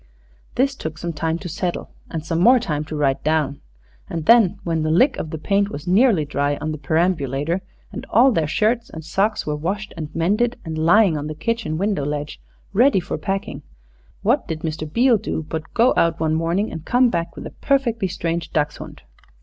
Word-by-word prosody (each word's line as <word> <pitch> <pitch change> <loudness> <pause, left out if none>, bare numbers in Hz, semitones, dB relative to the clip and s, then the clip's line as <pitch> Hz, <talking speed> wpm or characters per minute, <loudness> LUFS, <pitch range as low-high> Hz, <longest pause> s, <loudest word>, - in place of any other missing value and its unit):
This 275 +2 +2
took 160 - -6
some 170 +1 -4
time 160 +2 -1
to 180 - -7
settle, 175 +1 -3 0.2
and 160 -1 -5
some 165 0 -1
more 245 +8 +6
time 150 -8 -2
to 155 - -6
write 140 -3 0
down. 155 -2 0 0.5
And 165 -2 -4
then, 215 -3 +5
when 165 -2 -1
the 155 - 0
lick 255 - +4
of 160 - -4
paint 200 0 +2
was 145 -6 -7
nearly 190 - +3
dry 145 0 0
on 155 - -3
the 155 - -5
perambulator 160 +1 0 0.3
and - - -7
all 250 +5 +5
their 165 -9 0
shirts 225 +8 0
and 160 -1 -9
socks 200 +6 0
were 150 - -1
washed 195 +8 -3
and 155 -3 -5
mended, 210 +9 +1
and 160 -1 -4
lying 165 +1 +4
on 145 - -5
the 155 - -5
kitchen 230 -2 -2
window 195 -4 0
ledge 145 +1 -4 0.3
ready 240 +1 +4
for 175 - -4
packing, 195 -7 -3 0.6
what 245 +6 +2
did 160 -3 -4
Mr. 155 -2 -4
Beale 235 +3 +4
do 160 -6 -4
but 160 0 -5
go 240 +2 +4
out 170 0 +2
one 160 -1 +1
morning 170 +6 0
and 160 - -7
come 245 +6 +3
back 170 -1 -2
with - - -8
a - - -7
perfectly 240 -7 +1
strange 170 -1 -3
dachshund. 150 -1 -3
170 Hz, 200 wpm, -21 LUFS, 155-210 Hz, 0.6 s, more